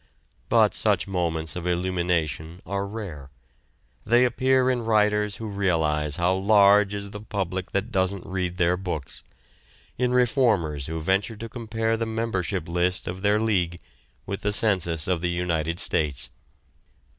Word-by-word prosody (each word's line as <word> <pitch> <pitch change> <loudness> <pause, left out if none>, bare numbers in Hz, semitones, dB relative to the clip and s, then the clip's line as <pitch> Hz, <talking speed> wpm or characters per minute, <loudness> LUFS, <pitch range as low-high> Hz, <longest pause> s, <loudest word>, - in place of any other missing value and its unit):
But - - +4
such - - +1
moments 80 -4 -2
of 90 0 -4
illumination 85 -2 -1
are 100 +1 -2
rare. 95 -11 -7 0.7
They 120 +2 +4
appear 130 +1 +2
in 125 -1 -1
writers 105 -2 +2
who 110 - -7
realize 80 -8 0
how 85 +2 +2
large 100 +1 +4
is 100 0 -6
the 105 - -7
public 95 -3 -3
that 100 +5 -2
doesn't 95 -1 0
read 90 -1 -3
their 90 0 +2
books, 85 -7 -5 0.8
in 125 -1 +2
reformers 110 - +2
who 80 0 -4
venture 95 +6 0
to 115 +2 -7
compare 115 -1 -2
the 115 0 -2
membership 105 -6 -2
list 90 +2 0
of 90 +1 -5
their 105 +1 +3
league 90 -6 0 0.5
with 100 0 -4
the 105 0 0
census 90 -8 +2
of 90 -3 0
the 90 - 0
United 85 -2 -1
States. 75 -6 0
95 Hz, 145 wpm, -25 LUFS, 85-105 Hz, 0.8 s, But